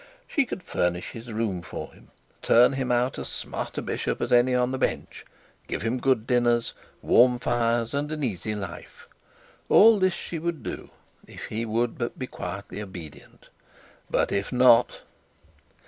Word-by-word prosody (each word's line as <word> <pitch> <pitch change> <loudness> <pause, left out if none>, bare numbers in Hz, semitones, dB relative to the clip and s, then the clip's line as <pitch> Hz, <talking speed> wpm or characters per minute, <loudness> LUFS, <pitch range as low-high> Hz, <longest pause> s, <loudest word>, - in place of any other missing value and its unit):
She 280 -4 +1
could 190 - -6
furnish 90 - -1
his 115 +1 -9
room 105 -5 -2
for 85 - -8
him, - - -20 0.3
turn 120 +3 +5
him 130 -2 -2
out 125 +1 +1
as - - -5
smart - - -6
a - - -2
bishop - - -2
as - - -3
any 125 +1 +4
on 125 0 +1
the 130 - -3
bench, - - -3 0.4
give - - -4
him 115 +3 -1
good 125 -4 +1
dinners, 120 -1 +1 0.3
warm 125 +1 +5
fires, 115 -1 0
and 145 +2 -2
an 155 -1 -3
easy 110 -2 -2
life; 95 -4 -8 0.6
all 220 0 +7
this 185 -1 +2
she 165 - -6
would 165 -5 -3
do - - -6 0.4
if - - -9
he 115 +2 -3
would 115 +2 -1
but 120 - -3
be 130 - -4
quietly 100 -2 -7
obedient. 90 -7 -11 0.6
But - - +1
if 100 0 -1
not 125 -1 +4
120 Hz, 165 wpm, -26 LUFS, 110-130 Hz, 0.6 s, all